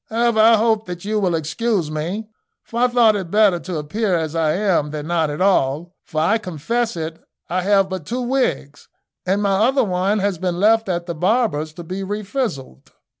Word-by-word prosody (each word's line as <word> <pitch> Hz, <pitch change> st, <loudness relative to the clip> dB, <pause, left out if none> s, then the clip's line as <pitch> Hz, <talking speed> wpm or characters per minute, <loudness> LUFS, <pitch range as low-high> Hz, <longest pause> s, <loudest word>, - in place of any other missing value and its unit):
However, 230 Hz, 0 st, +1 dB
I 225 Hz, +1 st, +7 dB
hope 220 Hz, -1 st, +1 dB
that 180 Hz, +1 st, -7 dB
you 215 Hz, +1 st, 0 dB
will 180 Hz, -4 st, +1 dB
excuse 165 Hz, +2 st, -1 dB
me, 175 Hz, +8 st, -4 dB, 0.4 s
for 230 Hz, -, -5 dB
I 250 Hz, -, +4 dB
thought 240 Hz, -3 st, +4 dB
it 190 Hz, -4 st, -4 dB
better 205 Hz, -2 st, +3 dB
to 175 Hz, -1 st, -5 dB
appear 185 Hz, +6 st, -1 dB
as 160 Hz, -2 st, -2 dB
I 160 Hz, -2 st, +1 dB
am 185 Hz, -6 st, +1 dB
than 150 Hz, 0 st, -5 dB
not 165 Hz, -2 st, 0 dB
at 150 Hz, +4 st, -4 dB
all; 170 Hz, -3 st, +1 dB
for, 155 Hz, -, -3 dB
I 205 Hz, +8 st, +2 dB
confess 220 Hz, +5 st, -2 dB
it, 160 Hz, 0 st, -5 dB, 0.3 s
I 185 Hz, +1 st, +1 dB
have 195 Hz, 0 st, +3 dB
but 185 Hz, -5 st, -6 dB
two 250 Hz, +2 st, -2 dB
wigs, 245 Hz, -, -2 dB, 0.4 s
and 195 Hz, +3 st, +1 dB
my 200 Hz, -1 st, +2 dB
other 270 Hz, +1 st, +2 dB
one 190 Hz, +1 st, 0 dB
has 200 Hz, -4 st, -1 dB
been 180 Hz, -1 st, -2 dB
left 220 Hz, +1 st, +3 dB
at 175 Hz, -1 st, -2 dB
the 170 Hz, -, -4 dB
barber's 180 Hz, -3 st, 0 dB
to 175 Hz, -, -9 dB
be 185 Hz, +4 st, -5 dB
refrizzled." 200 Hz, -, -4 dB
190 Hz, 200 wpm, -20 LUFS, 165-220 Hz, 0.4 s, I